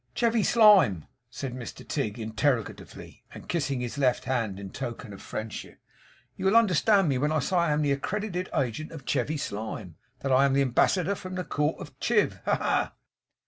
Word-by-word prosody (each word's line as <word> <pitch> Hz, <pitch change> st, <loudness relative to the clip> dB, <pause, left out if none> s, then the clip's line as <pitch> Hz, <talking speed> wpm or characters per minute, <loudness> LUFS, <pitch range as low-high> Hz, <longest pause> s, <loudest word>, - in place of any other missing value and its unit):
'Chevy 230 Hz, -1 st, +2 dB
Slyme?' 200 Hz, -, +5 dB, 0.2 s
said 130 Hz, 0 st, -5 dB
Mr 125 Hz, -2 st, -8 dB
Tigg, 125 Hz, -7 st, -2 dB
interrogatively, 110 Hz, +1 st, -3 dB
and -, -, -11 dB
kissing 140 Hz, -6 st, -1 dB
his 125 Hz, +3 st, -4 dB
left 130 Hz, -3 st, +2 dB
hand 115 Hz, -7 st, -1 dB
in 100 Hz, -1 st, -8 dB
token 115 Hz, -2 st, -6 dB
of 95 Hz, -, -11 dB
friendship. 110 Hz, 0 st, -6 dB, 0.6 s
'You -, -, -5 dB
will 195 Hz, +3 st, +4 dB
understand 200 Hz, -2 st, +4 dB
me 135 Hz, -3 st, +1 dB
when 150 Hz, +3 st, +1 dB
I 155 Hz, -, +2 dB
say 165 Hz, +6 st, 0 dB
that -, -, +4 dB
I 155 Hz, -, +1 dB
am 150 Hz, +1 st, +1 dB
the 145 Hz, -, +1 dB
accredited 185 Hz, +5 st, -2 dB
agent 135 Hz, +4 st, -2 dB
of 160 Hz, -6 st, -10 dB
Chevy 155 Hz, +1 st, 0 dB
Slyme; 105 Hz, -, -5 dB, 0.3 s
that 135 Hz, -, -1 dB
I 130 Hz, +2 st, +5 dB
am 135 Hz, -, +2 dB
the 140 Hz, 0 st, +3 dB
ambassador 175 Hz, +9 st, +2 dB
from 185 Hz, -1 st, -7 dB
the 180 Hz, -, -2 dB
court 150 Hz, 0 st, -1 dB
of 145 Hz, -, -9 dB
Chiv? 215 Hz, -3 st, +1 dB
Ha -, -, +3 dB
ha! -, -, 0 dB
140 Hz, 190 wpm, -27 LUFS, 120-180 Hz, 0.6 s, Slyme